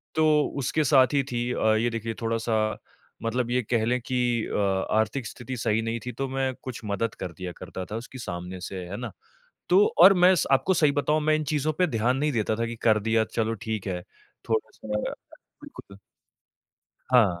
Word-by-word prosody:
तो 160 Hz, 0 st, +3 dB, 0.4 s
उसके 155 Hz, +4 st, +1 dB
साथ 135 Hz, -1 st, +4 dB
ही 140 Hz, -, +3 dB
थी 120 Hz, -, -1 dB
अ, 110 Hz, 0 st, +2 dB
ये 115 Hz, +2 st, +1 dB
देखिए 115 Hz, 0 st, -4 dB
थोड़ा-सा, 115 Hz, -1 st, 0 dB, 0.5 s
मतलब 120 Hz, +1 st, -1 dB
ये 125 Hz, +1 st, +2 dB
कह 115 Hz, -2 st, +2 dB
लें 125 Hz, +2 st, +1 dB
कि 125 Hz, +1 st, -2 dB, 0.3 s
अ, -, -, -3 dB, 0.4 s
आर्थिक 110 Hz, +3 st, 0 dB
स्थिति 125 Hz, +3 st, -7 dB
सही 110 Hz, -1 st, +1 dB
नहीं 115 Hz, +1 st, -2 dB
थी, 125 Hz, -, -3 dB
तो 135 Hz, +2 st, -3 dB
मैं 135 Hz, 0 st, -1 dB
कुछ 130 Hz, -3 st, -6 dB
मदद 105 Hz, +2 st, -2 dB
कर 90 Hz, -, -4 dB
दिया 90 Hz, 0 st, -6 dB
करता 95 Hz, -1 st, -7 dB
था 110 Hz, -, -3 dB
उसकी 130 Hz, -, -11 dB
सामने 90 Hz, +1 st, -5 dB
से, 95 Hz, -2 st, -6 dB
है 95 Hz, +3 st, -6 dB
ना। 120 Hz, -2 st, -5 dB, 0.6 s
तो 195 Hz, +3 st, +6 dB, 0.2 s
और 195 Hz, +1 st, +10 dB
मैं 180 Hz, 0 st, +6 dB
स -, -, +1 dB
आपको 135 Hz, +7 st, +3 dB
सही 150 Hz, -4 st, +3 dB
बताऊँ, 150 Hz, +2 st, +1 dB
मैं 155 Hz, 0 st, +3 dB
इन 155 Hz, -, -1 dB
चीज़ों 150 Hz, +1 st, 0 dB
पे 180 Hz, -, +4 dB
ध्यान 125 Hz, +4 st, +2 dB
नहीं 150 Hz, +1 st, +1 dB
देता 110 Hz, -2 st, 0 dB
था 115 Hz, +1 st, -1 dB
कि 115 Hz, 0 st, -5 dB
कर 110 Hz, -1 st, +5 dB
दिया, 110 Hz, 0 st, +3 dB
चलो 115 Hz, 0 st, -1 dB
ठीक 110 Hz, -3 st, -3 dB
है। 90 Hz, -2 st, -3 dB, 0.5 s
थोड़ा-सा 110 Hz, 0 st, -2 dB, 0.2 s
अ, -, -, -5 dB, 0.5 s
बिल्कुल 100 Hz, -, -12 dB, 1.1 s
हाँ। 105 Hz, -9 st, +4 dB
115 Hz, 200 wpm, -26 LUFS, 110-135 Hz, 1.1 s, और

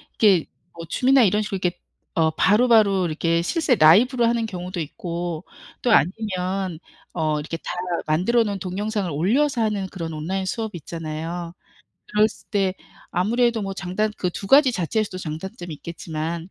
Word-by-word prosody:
이게 195 Hz, -7 st, +4 dB, 0.3 s
뭐 165 Hz, 0 st, -8 dB
줌이나 260 Hz, +9 st, +4 dB
이런 210 Hz, 0 st, +3 dB
식으로 195 Hz, -2 st, -3 dB
이렇게 180 Hz, -1 st, -1 dB, 0.3 s
어 160 Hz, -2 st, +2 dB
바로바로 210 Hz, +1 st, +4 dB
이렇게 165 Hz, +1 st, 0 dB
실제 270 Hz, -, +1 dB
라이브로 235 Hz, -, +5 dB
하는 230 Hz, 0 st, +1 dB
경우도 180 Hz, -3 st, -5 dB
있고 170 Hz, +1 st, -5 dB, 0.4 s
또 245 Hz, -, +1 dB
아니면 185 Hz, -2 st, 0 dB, 0.3 s
어 155 Hz, -3 st, 0 dB
이렇게 150 Hz, +2 st, -5 dB
다 -, -, -6 dB, 0.4 s
만들어 185 Hz, +10 st, +3 dB
놓은 200 Hz, -2 st, -3 dB
동영상을 200 Hz, +2 st, -2 dB
올려서 235 Hz, -, +1 dB
하는 210 Hz, -3 st, 0 dB
그런 170 Hz, -4 st, -6 dB
온라인 185 Hz, +5 st, -3 dB
수업이 220 Hz, -1 st, -3 dB
있잖아요. 165 Hz, +2 st, -5 dB, 0.6 s
들었을 210 Hz, +1 st, +1 dB
때 195 Hz, -3 st, +1 dB, 0.4 s
아무래도 230 Hz, +5 st, +1 dB
뭐 195 Hz, -1 st, -3 dB
장단 195 Hz, +3 st, -2 dB
그 180 Hz, -, 0 dB
2 260 Hz, -, +4 dB
자체에서도 210 Hz, 0 st, -2 dB
장단점이 175 Hz, +2 st, -6 dB
있겠지만 165 Hz, +1 st, -5 dB
185 Hz, 345 characters per minute, -23 LUFS, 170-215 Hz, 0.6 s, 라이브로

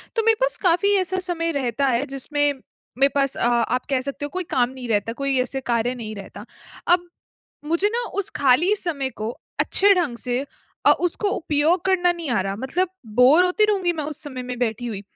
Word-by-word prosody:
तो 450 Hz, -, +2 dB
मेरे 455 Hz, 0 st, +5 dB
पास -, -, +1 dB
काफ़ी 365 Hz, +3 st, +3 dB
ऐसा 375 Hz, 0 st, 0 dB
समय 335 Hz, -1 st, -1 dB
रहता 275 Hz, -2 st, -1 dB
है 260 Hz, +2 st, +1 dB
जिसमें 290 Hz, +1 st, 0 dB, 0.4 s
मेरे 275 Hz, +1 st, +5 dB
पास 275 Hz, -1 st, +1 dB
अ, -, -, +2 dB
आप 240 Hz, +1 st, 0 dB
कह 265 Hz, -2 st, +1 dB
सकते 280 Hz, +2 st, -5 dB
हो 290 Hz, -, -5 dB
कोई 370 Hz, -, 0 dB
काम 245 Hz, -1 st, +2 dB
नहीं 255 Hz, -1 st, -8 dB
रहता, 220 Hz, +1 st, 0 dB
कोई 275 Hz, +1 st, -1 dB
ऐसे 265 Hz, +1 st, -4 dB
कार्य 235 Hz, +2 st, 0 dB
नहीं 220 Hz, -3 st, -7 dB
रहता। 200 Hz, +1 st, -10 dB, 0.4 s
अब 350 Hz, 0 st, +3 dB, 0.6 s
मुझे 370 Hz, +5 st, +3 dB
ना 485 Hz, -, 0 dB, 0.2 s
उस 400 Hz, -, -4 dB
खाली 285 Hz, +9 st, +3 dB
समय 295 Hz, -9 st, -2 dB
को 215 Hz, -, -2 dB, 0.3 s
अच्छे 400 Hz, 0 st, +4 dB
ढंग 310 Hz, -10 st, -1 dB
से 245 Hz, +1 st, -2 dB, 0.5 s
अ, -, -, +8 dB
उसको 360 Hz, +4 st, -1 dB
उपयोग 330 Hz, -2 st, +1 dB
करना 360 Hz, -2 st, +3 dB
नहीं 335 Hz, -4 st, -5 dB
आ 230 Hz, -, +1 dB
रहा 195 Hz, +1 st, -3 dB
मतलब 275 Hz, -, -1 dB, 0.3 s
बोर 265 Hz, +9 st, +6 dB
होती 365 Hz, +4 st, +3 dB
रहूँगी 385 Hz, -5 st, 0 dB
मैं 310 Hz, -, -4 dB
उस 305 Hz, +1 st, -5 dB
समय 260 Hz, -4 st, -6 dB
में 250 Hz, 0 st, -5 dB
बैठी 240 Hz, 0 st, -2 dB
हुई, 205 Hz, -4 st, -5 dB
285 Hz, 205 wpm, -22 LUFS, 250-355 Hz, 0.6 s, अ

